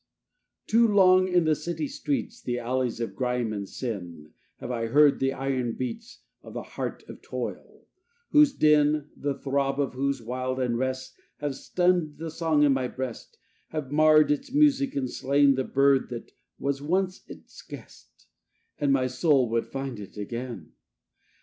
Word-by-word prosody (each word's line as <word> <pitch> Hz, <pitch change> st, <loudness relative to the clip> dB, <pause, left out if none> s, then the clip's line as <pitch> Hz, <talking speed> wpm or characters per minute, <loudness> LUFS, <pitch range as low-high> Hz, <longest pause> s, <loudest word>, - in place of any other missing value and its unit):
II -, -, -60 dB
Too 230 Hz, +2 st, +4 dB
long 185 Hz, -3 st, +5 dB
in 180 Hz, -2 st, +3 dB
the 155 Hz, -1 st, +3 dB
city 170 Hz, -, -3 dB
streets, 280 Hz, -3 st, -3 dB
The 120 Hz, 0 st, -2 dB
alleys 125 Hz, 0 st, -2 dB
of 115 Hz, -, -4 dB
grime 125 Hz, -3 st, -1 dB
and 100 Hz, -2 st, -5 dB
sin, 90 Hz, -, -6 dB, 0.3 s
Have 125 Hz, -, -6 dB
I 115 Hz, -2 st, -2 dB
heard 145 Hz, +4 st, +5 dB
the 135 Hz, 0 st, +1 dB
iron 130 Hz, -3 st, -2 dB
beats 225 Hz, -, -6 dB, 0.2 s
Of -, -, -12 dB
the -, -, -4 dB
heart -, -, -6 dB
of -, -, -11 dB
toil; -, -, -7 dB, 0.5 s
whose 300 Hz, -1 st, +6 dB
din, 150 Hz, -, +4 dB
And 150 Hz, -1 st, -7 dB
the 140 Hz, -1 st, -3 dB
throb 140 Hz, 0 st, -1 dB
of 140 Hz, -3 st, 0 dB
whose 140 Hz, +1 st, -1 dB
wild 130 Hz, +2 st, -3 dB
unrest 130 Hz, +1 st, -2 dB, 0.2 s
Have 145 Hz, -1 st, -3 dB
stunned 175 Hz, -1 st, 0 dB
the 160 Hz, +1 st, -6 dB
song 160 Hz, -2 st, +1 dB
in 145 Hz, -2 st, +5 dB
my 130 Hz, -1 st, -1 dB
breast, 130 Hz, -2 st, -7 dB, 0.3 s
Have 150 Hz, -4 st, -5 dB
marred 155 Hz, 0 st, +5 dB
its 150 Hz, -, -2 dB
music 280 Hz, -1 st, +3 dB
and 135 Hz, -2 st, -1 dB
slain 140 Hz, +2 st, +3 dB
The 130 Hz, -1 st, -1 dB
bird 135 Hz, 0 st, +3 dB
that 120 Hz, -1 st, -7 dB, 0.3 s
was 140 Hz, 0 st, -2 dB
once 185 Hz, +5 st, -1 dB
its -, -, -13 dB
guest, -, -, -13 dB, 0.5 s
And 145 Hz, -1 st, +2 dB
my 135 Hz, -1 st, +2 dB
soul 130 Hz, +1 st, +2 dB
would 115 Hz, 0 st, 0 dB
find 135 Hz, -4 st, -5 dB
it 100 Hz, 0 st, -10 dB
again. 115 Hz, -4 st, -6 dB
140 Hz, 170 wpm, -26 LUFS, 125-155 Hz, 0.5 s, whose